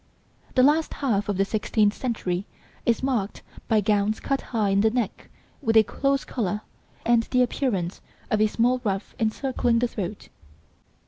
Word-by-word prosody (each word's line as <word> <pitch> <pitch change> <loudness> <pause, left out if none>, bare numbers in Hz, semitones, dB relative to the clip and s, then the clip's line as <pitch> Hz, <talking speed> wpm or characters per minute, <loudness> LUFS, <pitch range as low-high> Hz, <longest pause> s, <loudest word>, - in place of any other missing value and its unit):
The 255 - +5
last 305 +4 +3
half 210 -8 0
of 200 - 0
the 195 - +3
sixteenth 210 0 +1
century 200 -7 -2 0.4
is 235 +1 +2
marked 235 -7 -1 0.2
by 220 -1 +3
gowns 205 +1 +1
cut 275 0 -1
high 215 -4 +1
in 195 0 +3
the 220 - +4
neck 230 -3 -3 0.3
with 225 -5 +3
a 220 - +8
close 275 +5 0
collar, 210 -4 -2 0.4
and 235 0 +4
the 250 -1 +3
appearance 200 -8 -1 0.3
of 215 - +2
a 215 - +5
small 245 +4 +1
ruff 195 -2 -2
encircling 240 +1 +1
the 245 +1 +2
throat. 205 -3 -6
220 Hz, 165 wpm, -25 LUFS, 205-250 Hz, 0.4 s, a